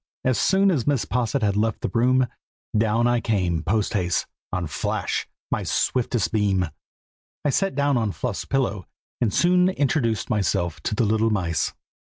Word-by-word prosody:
As 130 -2 +2
soon 195 +1 +4
as 140 -9 0
Mrs. 140 -4 +1
Posset 125 +1 0
had 100 -1 +2
left 110 +1 0
the - - -2
room, 125 +2 +3 0.5
down 110 +2 +2
I 120 0 +3
came 90 -8 0
post 105 +7 0
haste, 90 -4 0 0.3
on 90 -2 -1
Flash, 75 - -2 0.2
my - - 0
swiftest 120 -3 0
beam. 100 -4 +2 0.8
I 145 - +3
sat 195 +1 0
down 140 -1 +2
on 110 -3 0
Fluff's 115 0 -4
pillow, 105 - -1 0.3
and 115 -4 +2
soon 180 - +4
introduced 135 - 0
myself 95 -6 0
to 105 - -2
the 115 - +2
little 110 +2 +2
mice. 90 -6 0
115 Hz, 165 wpm, -24 LUFS, 100-130 Hz, 0.8 s, soon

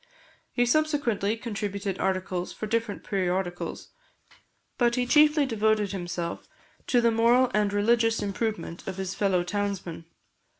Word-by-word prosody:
He 245 - +2
subsequently 245 -7 +1
contributed 205 -4 -4
articles 185 -1 -1
for - - -6
different 230 -1 -2
periodicals; 180 -2 -2 0.9
but 240 -1 +3
he 250 -1 +1
chiefly 300 +2 +5
devoted 220 -4 +1
himself 175 -3 -4 0.4
to 245 - +3
the 235 0 +3
moral 240 +3 +4
and 210 -1 +2
religious 225 +2 +2
improvement 205 -3 -3
of 190 -1 -4
his 190 -1 -3
fellow 190 -4 +1
townsmen. 195 -3 -3
210 Hz, 125 wpm, -27 LUFS, 190-235 Hz, 0.9 s, chiefly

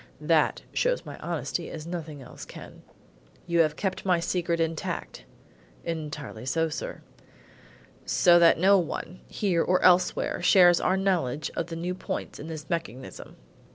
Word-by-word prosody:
That - - +2
shows - - 0
my - - -9
honesty - - -3
as 155 -1 -7
nothing 160 -5 -6
else 125 - -11
can." - - -11 0.6
"You 170 -1 0
have 155 -2 +3
kept 190 +1 -3
my 180 -3 +2
secret 170 0 -1
intact?" 160 - -3 0.6
"Entirely 150 -8 -5
so, 165 +4 +1
sir." 150 - -6 1.0
"So 175 -1 +5
that 170 -1 +6
no 195 +3 +5
one, 175 +1 -5
here 185 -5 0
or 185 +2 +2
elsewhere, 180 -1 +3
shares 175 -1 +6
our 190 - +2
knowledge 170 -7 0
of 165 - -2
the 165 - -6
new 175 +2 -3
points 185 - -5
in 150 - -7
this 155 -2 -7
mechanism?" 160 -7 -5
170 Hz, 150 wpm, -27 LUFS, 155-180 Hz, 1.0 s, that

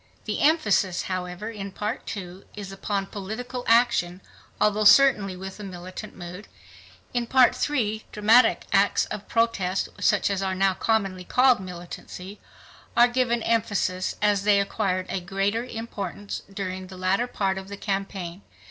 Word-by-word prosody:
The - - -2
emphasis, 210 - +3
however, 185 +3 -4
in 200 -3 -6
Part 210 +2 -4
II 185 0 -9
is 200 -2 -7
upon 195 0 -2
political 220 +6 -6
action, 230 -6 +3 0.4
although 210 0 +2
certainly 210 -5 +6
with 190 +2 -8
a - - -7
militant 185 -1 -8
mood. 180 +3 -9 0.7
In 240 -1 -1
Part 260 -1 +5
III 220 -7 -1
dramatic 220 +4 +4
acts - - +3
of - - -7
protest, 205 -5 0
such - - +2
as 195 -1 -1
are 190 -1 -1
now 195 0 +3
commonly 195 -3 0
called 250 +3 +4
militancy, 180 +2 -9 0.6
are 240 +1 +8
given 240 -2 0
emphasis 200 -5 0
as 205 -2 +3
they 205 -1 +4
acquired 185 -2 -1
a 190 - -1
greater 195 +5 -1
importance 205 -5 -6
during 185 -1 -5
the 185 0 -11
latter 190 +6 +1
part 195 -5 -1
of 190 - -10
the 200 0 -7
campaign. 195 -3 -4
200 Hz, 150 wpm, -25 LUFS, 185-225 Hz, 0.7 s, are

